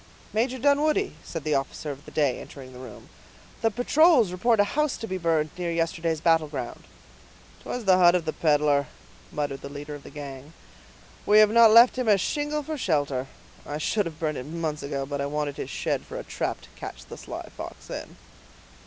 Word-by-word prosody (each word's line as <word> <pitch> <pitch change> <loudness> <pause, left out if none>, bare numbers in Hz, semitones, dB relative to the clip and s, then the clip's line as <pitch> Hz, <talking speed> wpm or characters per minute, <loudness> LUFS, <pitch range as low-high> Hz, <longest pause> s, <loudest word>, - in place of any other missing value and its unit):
"Major 245 +4 0
Dunwoodie," 295 - +2
said 165 -3 -6
the 155 - 0
officer 140 +2 -2
of 140 +2 -10
the - - -10
day, 145 -4 +1
entering 130 -2 -11
the 125 - -11
room, 125 -4 -11 0.5
"the 225 - +3
patrols 245 - +4
report 220 +5 +2
a - - +7
house 300 -1 +1
to 225 - -5
be 185 -3 -4
burned 160 -3 +1
near 175 -1 -1
yesterday's 165 -1 -1
battle 165 -1 +3
ground." 130 -5 -6 0.8
"'Twas 245 -3 -5
the 185 -1 +5
hut 175 0 +6
of 175 -2 0
the 155 - -2
peddler," 145 -3 +2 0.4
muttered 145 -2 -3
the 140 - -7
leader 145 +1 -7
of 145 - -8
the - - -12
gang. 140 0 -9 0.7
"We 210 - +6
have 215 -1 +7
not 230 0 +7
left 235 +3 +7
him 250 - -1
a 210 -2 +6
shingle 295 +8 -1
for 310 0 -5
shelter; 145 - 0 0.4
I 145 - -5
should 200 +5 0
have 160 -2 -8
burned 155 -3 -1
it 125 - -8
months 155 -2 -3
ago, 140 -1 -3
but 140 0 -3
I 140 - -1
wanted 145 -1 -3
his - - -5
shed - - -1
for - - -8
a - - -5
trap - - -3
to - - -16
catch - - -8
the - - -9
sly - - -8
fox - - -9
in." - - -7
165 Hz, 205 wpm, -26 LUFS, 145-220 Hz, 0.8 s, a